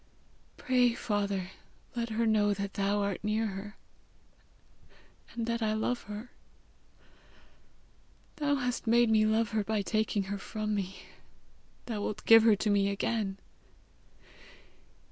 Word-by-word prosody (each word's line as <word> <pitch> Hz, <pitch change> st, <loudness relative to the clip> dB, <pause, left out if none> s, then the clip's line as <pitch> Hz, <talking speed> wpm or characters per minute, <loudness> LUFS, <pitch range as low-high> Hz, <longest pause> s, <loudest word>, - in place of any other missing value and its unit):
Pray, 250 Hz, -2 st, +2 dB
Father, 200 Hz, -4 st, -2 dB, 0.4 s
let 235 Hz, -1 st, -2 dB
her 225 Hz, +1 st, 0 dB
know 210 Hz, -2 st, +3 dB
that 200 Hz, 0 st, -4 dB
thou 200 Hz, 0 st, 0 dB
art 200 Hz, -1 st, -3 dB
near 215 Hz, +1 st, 0 dB
her, 205 Hz, 0 st, -6 dB, 1.6 s
and 230 Hz, -1 st, -2 dB
that 235 Hz, 0 st, -2 dB
I 215 Hz, -1 st, +1 dB
love 230 Hz, +3 st, -1 dB
her. 210 Hz, +4 st, -8 dB, 2.1 s
Thou 290 Hz, -1 st, +1 dB
hast 250 Hz, -3 st, -2 dB
made 235 Hz, 0 st, +4 dB
me 215 Hz, -1 st, +4 dB
love 220 Hz, +1 st, +1 dB
her 215 Hz, -1 st, 0 dB
by 215 Hz, 0 st, -1 dB
taking 215 Hz, 0 st, 0 dB
her 200 Hz, +1 st, -5 dB
from 215 Hz, +1 st, -3 dB
me: 195 Hz, -2 st, -4 dB, 0.8 s
thou 220 Hz, -4 st, -4 dB
wilt 210 Hz, -, -4 dB
give 225 Hz, 0 st, +9 dB
her 220 Hz, -1 st, +5 dB
to 210 Hz, +1 st, 0 dB
me 200 Hz, -1 st, +3 dB
again! 200 Hz, -1 st, -1 dB
215 Hz, 130 wpm, -30 LUFS, 200-230 Hz, 2.1 s, give